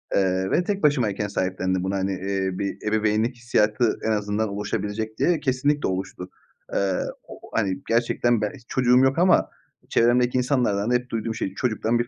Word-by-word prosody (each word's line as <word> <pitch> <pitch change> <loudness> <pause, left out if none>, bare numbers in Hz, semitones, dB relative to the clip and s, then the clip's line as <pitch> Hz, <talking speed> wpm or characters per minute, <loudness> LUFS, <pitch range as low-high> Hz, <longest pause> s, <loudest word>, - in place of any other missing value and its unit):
Eee, 95 -1 +1
ve 180 - +3
tek 200 +2 -2
başımayken 115 -8 +2
sahiplendim 95 -1 -1
bunu. 95 +1 -1
Hani, 95 0 -1
eee, 95 0 -2
bir 100 +1 -4
ebeveynlik 110 +3 +1
hissiyatı 115 -1 +1
en 110 - +1
azından 105 0 -1
oluşabilecek 105 +2 -3
diye, 175 -2 +2
kesinlikle 145 +2 0
oluştu. 95 -1 -4 0.4
Eee, 95 -2 +1 0.3
o - - -11
o, - - -16
hani, 95 -4 0
gerçekten 120 0 +1
ben 105 - -1
hiç 125 - -15
çocuğum 125 -1 +3
yok 135 +2 +2
ama 180 0 +4 0.4
çevremdeki 125 +1 +3
insanlardan 125 -5 +1
da - - +3
hep 125 0 -1
duyduğum 115 0 -3
şey, 95 - -3
"Çocuktan 120 0 0
bir 120 - -1
110 Hz, 175 wpm, -24 LUFS, 100-125 Hz, 0.4 s, ama